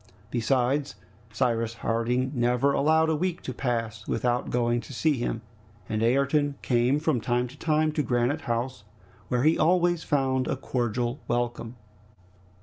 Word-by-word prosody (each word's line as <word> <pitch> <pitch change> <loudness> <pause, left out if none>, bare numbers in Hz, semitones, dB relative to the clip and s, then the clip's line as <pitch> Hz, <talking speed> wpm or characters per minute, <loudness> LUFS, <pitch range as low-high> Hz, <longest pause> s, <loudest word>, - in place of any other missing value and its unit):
Besides, 130 +4 +1 0.4
Cyrus 115 -1 0
Harding 120 +3 0
never 125 +2 +2
allowed 160 +3 +3
a 160 - +2
week 180 +2 -2
to 130 - -4
pass 115 -4 -3
without 120 0 0
going 120 -1 +1
to 140 - -11
see 155 +5 +2
him, 115 -1 -2 0.4
and 110 0 -2
Ayrton 140 +4 +2
came 125 +2 +2
from 150 -6 0
time 120 +2 0
to 135 - -13
time 155 -1 +2
to 150 - 0
Granite 125 +3 0
House, 120 -1 -3 0.4
where 125 0 0
he 160 +2 +3
always 175 0 +3
found 130 -3 +1
a - - 0
cordial 120 0 -2
welcome. 120 0 -2
125 Hz, 145 wpm, -27 LUFS, 120-145 Hz, 0.4 s, allowed